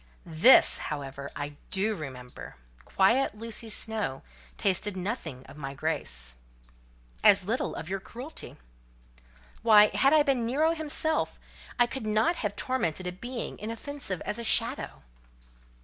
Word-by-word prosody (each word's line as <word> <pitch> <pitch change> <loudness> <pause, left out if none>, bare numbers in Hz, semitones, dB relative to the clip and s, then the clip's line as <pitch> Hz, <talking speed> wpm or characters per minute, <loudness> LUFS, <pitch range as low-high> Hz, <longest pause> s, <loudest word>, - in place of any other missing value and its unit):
"This, 170 +10 +6
however, 140 -1 -6
I 145 0 -6
do 205 +3 0
remember: 130 -8 -9 0.3
quiet 220 +5 +2
Lucy 225 +1 -3
Snowe 215 -10 0 0.3
tasted 195 0 0
nothing 175 - -5
of 150 - -13
my 135 -1 -6
grace." 65 - -1 0.9
"As - - +6
little - - -2
of 160 - -6
your 195 +2 -3
cruelty." 250 +10 -9 1.0
"Why, 210 -2 +6
had 275 - +3
I 305 -1 +5
been 270 -4 +1
Nero 290 +8 +2
himself, 315 -1 0 0.4
I 240 - +5
could 240 -2 -6
not 220 +12 +2
have 205 -2 -3
tormented 190 - -2
a 180 - -2
being 235 +7 -6
inoffensive 230 - -4
as 210 - -3
a - - -5
shadow." - - 0
210 Hz, 135 wpm, -28 LUFS, 160-245 Hz, 1.0 s, This